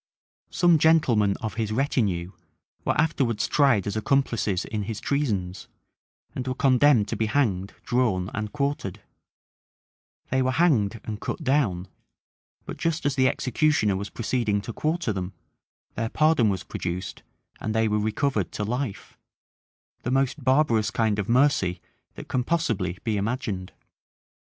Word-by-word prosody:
Some 175 -3 +4
gentlemen 125 -11 +3
of 110 - -3
his 110 -1 -2
retinue 105 -9 0 0.5
were - - 0
afterwards 135 -8 +1
tried 135 -9 +3
as 100 - -3
accomplices 110 -6 0
in 110 -1 -3
his 110 0 -4
treasons, 105 -11 -2 0.7
and 130 0 -5
were 130 - -1
condemned 130 -4 +4
to - - -2
be 110 - 0
hanged, 100 -7 0
drawn, 110 -7 0
and 105 0 -3
quartered, 140 -9 -3 1.3
They 130 0 +2
were 130 0 +1
hanged 120 - +2
and 105 -1 -6
cut - - -4
down; 105 -10 +1 0.8
but - - -7
just 165 -2 -1
as 145 - +2
the 130 -1 +3
executioner 125 -6 +1
was 100 +1 -4
proceeding 115 -3 -1
to 115 - -7
quarter 155 -5 -1
them, 95 -1 -4 0.6
their 115 0 -2
pardon 155 -7 +3
was 95 -2 -2
produced, 90 +1 -5 0.4
and 110 0 -3
they 110 0 +3
were 105 0 +1
recovered 110 - -1
to 105 - -3
life;[*] 120 0 -4 0.8
the - - -3
most 135 +2 0
barbarous 130 -5 +3
kind 110 -2 0
of 100 - -3
mercy 120 -9 +3 0.4
that - - -9
can 125 - 0
possibly 115 - -1
be 110 -3 0
imagined! 100 -3 -3
115 Hz, 145 wpm, -25 LUFS, 100-140 Hz, 1.3 s, Some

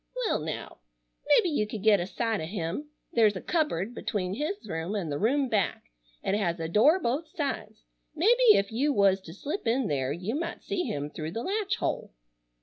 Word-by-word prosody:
"Well - - +1
now. 155 - -6 0.5
Mebbe - - +5
you 210 -7 +1
could 210 -2 -6
get 215 -2 +6
a 175 - -2
sight 225 0 -1
o' - - -3
him. 185 - -4 0.2
There's 215 -3 +4
a - - -3
cupboard 245 - -1
between 190 -5 -2
his 300 - -3
room 165 +3 -3
an' 185 -6 -2
the 145 - -2
room 270 +6 +2
back. 200 - -1 0.3
It - - 0
has 180 -5 0
a 165 - -2
door 230 - +5
both 285 +3 -1
sides. 270 -8 -4 0.3
Mebbe 455 +7 +6
ef 200 +2 +1
you 275 +7 +1
was 195 -3 +4
to 165 - -11
slip 285 - -4
in 245 +3 +2
there 135 -2 0
you 180 +8 -3
might 335 +4 -4
see 375 -3 -2
him 145 +1 -3
through 155 +1 -5
the 230 - -3
latch 405 +1 0
hole. - - -3
215 Hz, 200 wpm, -28 LUFS, 180-295 Hz, 0.5 s, get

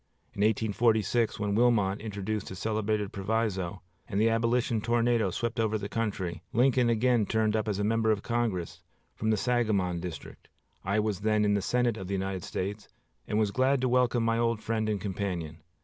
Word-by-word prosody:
In 100 - -4
1846, 110 +1 +2
when 105 -1 -1
Wilmot 105 -4 +2
introduced 105 -1 -4
his 95 - -7
celebrated 105 -1 -1
proviso, 95 -3 -2 0.2
and 100 - -2
the 115 +1 +4
Abolition 115 0 +1
tornado 120 -2 +2
swept 115 +5 -3
over 110 -1 +1
the 100 -1 -5
country, 100 -6 -3
Lincoln 125 0 +3
again 115 -2 +2
turned 110 -1 +1
up 110 0 -1
as 105 -3 -1
a 105 - -1
member 110 +1 +1
of 105 -2 +1
Congress 95 -8 -2 0.3
from 110 - -2
the 110 - +3
Sangamon 105 -7 +1
district. 90 -1 -8 0.3
I 100 +3 +1
was 105 -3 -1
then 105 0 +2
in 105 - +3
the 100 - +1
Senate 120 +2 +1
of 95 - -6
the 100 - -1
United 95 -1 -2
States, 100 +3 -4 0.4
and 105 - -1
was 105 -2 +2
glad 130 +4 +2
to 130 - +2
welcome 125 -1 +2
my 115 0 +1
old 115 -2 0
friend 110 -1 -1
and 105 -2 -1
companion. 90 -6 -4
110 Hz, 185 wpm, -29 LUFS, 100-115 Hz, 0.4 s, the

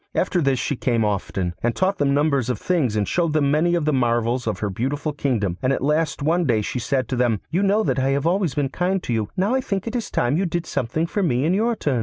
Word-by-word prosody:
After 180 -1 +1
this 135 -3 +2
she 125 +4 -1
came 120 -3 0
often, 95 -3 -2
and 120 0 0
taught 190 +1 0
them 140 -1 +2
numbers 140 -4 +1
of 125 - 0
things, 150 -12 0
and 105 -1 0
showed 170 -3 0
them 145 -3 +2
many 170 +4 +2
of 165 -3 0
the 155 - +1
marvels 120 -1 +1
of 110 - -1
her 105 -2 -2
beautiful 145 - -2
kingdom, 110 -11 -1
and 130 - +1
at 135 - -1
last 150 0 0
one 170 +3 +2
day 115 -6 +1
she 125 - -3
said 130 +1 -1
to 130 - -1
them, 120 -4 +1
'You 175 +4 +1
know 205 +2 +2
that 140 - 0
I 130 +1 +1
have 140 +2 0
always 175 -4 +1
been 145 -2 0
kind 180 +5 -1
to 120 - -2
you; 110 -2 -1
now 195 +6 +1
I 265 - +2
think 195 -6 -3
it 230 +1 -4
is 235 - -2
time 120 +5 +1
you 190 +1 +1
did 170 0 -2
something 140 +4 -1
for 200 +4 -2
me 135 -7 +1
in 170 - +2
your 230 +4 +1
turn. 140 - -1
140 Hz, 275 wpm, -22 LUFS, 120-175 Hz, -, this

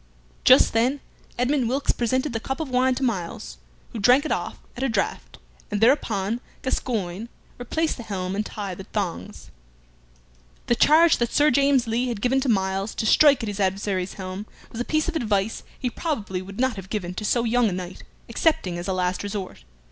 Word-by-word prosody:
Just - - +6
then 250 +5 +2 0.4
Edmund 250 0 +1
Wilkes 275 +3 +1
presented 255 +3 -1
the 225 - -1
cup 265 +6 -4
of 315 -4 -3
wine 255 +1 +3
to 270 - -3
Myles, 170 - -3 0.3
who 230 - -5
drank 250 +7 +5
it - - -2
off - - -2 0.2
at 245 - -6
a 270 - +1
draught, 210 -4 -2 0.3
and 205 - -1
thereupon 225 -3 +2 0.2
Gascoyne 220 -5 -2 0.3
replaced 315 +7 -1
the - - -7
helm 195 -4 -4
and 210 - 0
tied 200 -4 -6
the 190 - -7
thongs. 185 - -5 1.1
The - - +2
charge 315 +7 +5
that 235 -1 -1
Sir 295 +1 +4
James 275 -1 +3
Lee 235 +3 0
had 235 -4 -3
given 255 +4 +1
to 265 - -1
Myles 195 -1 0
to - - -2
strike 280 +2 +5
at - - -3
his 205 -1 -4
adversary's 190 -1 -1
helm 190 +2 -6 0.2
was 230 - -4
a - - -2
piece 310 +1 0
of 345 - -3
advice 215 -6 0 0.2
he 250 -2 -2
probably 215 - -3
would 195 +3 -10
not 260 -4 +1
have 190 0 -8
given 180 -5 -3
to 200 - -5
so 235 +3 +1
young 235 -1 +2
a - - -4
knight, 180 0 -6 0.3
excepting 230 - 0
as 175 - -6
a 190 - 0
last 180 0 -1
resort. 200 - -6
225 Hz, 195 wpm, -24 LUFS, 195-260 Hz, 1.1 s, Just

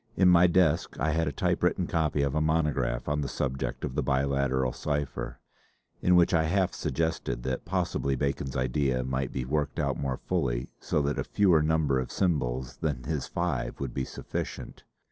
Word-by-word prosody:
In 95 - +6
my 90 0 +7
desk 85 -2 +2
I 80 +5 +1
had 80 0 +1
a - - 0
typewritten 70 - +1
copy 75 -3 0
of 70 -1 0
a 75 - +1
monograph 75 -2 0
on 75 0 0
the 70 - -2
subject 65 -1 -2
of - - -5
the - - 0
Biliteral 65 -1 +1
cipher, 75 -1 -3 0.6
in 90 - +4
which 90 0 +5
I 80 -1 +3
half 95 +3 +1
suggested 80 -6 -2
that 65 +4 -3
possibly 85 -6 0
Bacon's 70 0 -2
idea 65 0 +1
might 65 0 -2
be 65 -2 -3
worked 75 +1 -1
out 70 -5 0
more 65 -2 -1
fully 65 -9 -1
so 75 - 0
that 70 +1 -1
a - - 0
fewer 90 -6 +3
number 75 -3 +2
of 65 - -4
symbols 65 -8 -1
than 75 -6 -2
his 75 -1 -2
five - - -2
would 70 -3 -4
be 65 - -1
sufficient. - - -6
70 Hz, 185 wpm, -28 LUFS, 65-80 Hz, 0.6 s, my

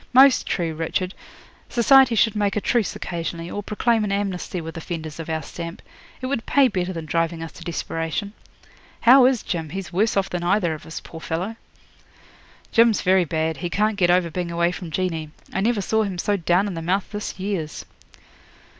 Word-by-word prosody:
'Most 265 +1 +6
true, 170 -3 -1
Richard. 170 +4 -2 0.6
Society 255 0 +5
should 220 -1 +3
make 205 -1 +1
a - - +2
truce 230 0 0
occasionally, 170 0 -4
or 205 - -3
proclaim 220 +2 +1
an 205 - -1
amnesty 195 -2 -2
with 165 -1 -7
offenders 160 -2 -6
of 165 - -6
our 160 0 -2
stamp. 170 0 -7 0.4
It - - -3
would 255 -3 -2
pay 280 -2 +5
better 185 -3 -2
than 165 -3 -5
driving 165 +1 -1
us 165 - -7
to - - -12
desperation. 165 +3 -3 0.7
How 250 +2 +8
is 255 -4 +1
Jim? 165 -4 -3
He's 190 +1 -6
worse 215 +4 +2
off 195 -1 +2
than 180 - -3
either 175 -1 +2
of 155 - -9
us, 160 - -6
poor 165 - -10
fellow.' 180 +9 -3 1.2
'Jim's 230 -1 +4
very 185 -1 +4
bad. 160 0 -1
He 175 - -3
can't 210 +4 +1
get 180 -3 +2
over 175 -1 +3
being 175 +1 -3
away 170 +1 +1
from 180 -1 -7
Jeanie. 160 -2 -2 0.2
I 190 - 0
never 220 0 +1
saw 220 +3 +1
him 195 -4 -2
so 205 +4 +1
down 180 +1 +2
in 200 - -3
the 165 - -4
mouth 185 +4 -1
this 205 -2 -5
years.' 185 -6 -3
185 Hz, 195 wpm, -23 LUFS, 165-210 Hz, 1.2 s, How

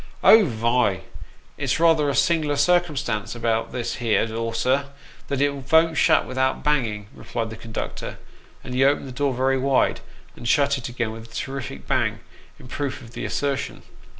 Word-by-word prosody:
" - - -27
Oh! 220 -2 +8
vy, 115 - +1 0.6
it's - - 0
rather 165 -3 +4
a 140 - -1
sing'ler 150 +1 +2
circumstance 145 - +1
about 115 -1 -1
this 120 -2 -3
here 115 -2 +2
door, 115 0 -3
sir, 130 +4 +1 0.4
that 140 -1 -1
it 145 0 +3
von't 160 +4 +3
shut - - +4
without 130 +1 -1
banging," 115 -9 0
replied 115 -1 -5
the - - -6
conductor; 110 0 -6 0.5
and 125 - -7
he 130 +1 +3
opened 140 0 +2
the - - -7
door 140 +2 0
very 130 +1 +1
wide, 135 0 +2 0.4
and 120 - -7
shut 140 +1 +3
it 120 - -6
again 115 -2 -2
with 115 +1 -10
a - - -13
terrific 135 0 -5
bang, - - 0 0.4
in - - -13
proof 140 +1 -4
of 115 - -13
the - - -5
assertion. 140 -1 -2
130 Hz, 175 wpm, -23 LUFS, 115-145 Hz, 0.6 s, Oh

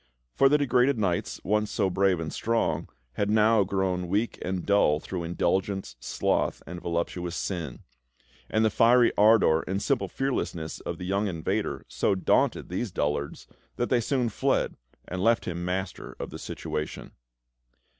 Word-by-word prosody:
For 135 +1 +5
the 150 - +5
degraded 130 -1 +3
knights, 95 -5 -1
once 105 +1 +1
so 100 - +1
brave 95 -1 +2
and 80 -2 -4
strong, 85 -8 0 0.3
had 100 - 0
now 110 0 +4
grown 95 -2 -1
weak 105 +6 -1
and 90 -1 -3
dull 100 -7 +3
through 90 +2 -5
indulgence, 95 +3 -1
sloth, - - -1
and 90 -1 -7
voluptuous 85 +1 -2
sin; 85 -10 -4 0.7
and 110 0 +2
the 110 - +2
fiery 120 +3 +5
ardour 105 -7 +5
and 95 +1 -1
simple 135 +4 0
fearlessness 85 - -3
of 85 - -5
the 90 - -6
young 100 +3 0
invader 85 -4 -2
so - - +1
daunted 95 - +1
these 95 +6 -2
dullards 75 -2 -2 0.3
that 120 - -1
they 125 -2 +4
soon 125 0 0
fled 100 - 0 0.3
and 90 0 -3
left 115 +1 +3
him 85 -1 -4
master 95 +2 -4
of - - -5
the - - -7
situation. 75 0 -5
95 Hz, 155 wpm, -27 LUFS, 85-110 Hz, 0.7 s, For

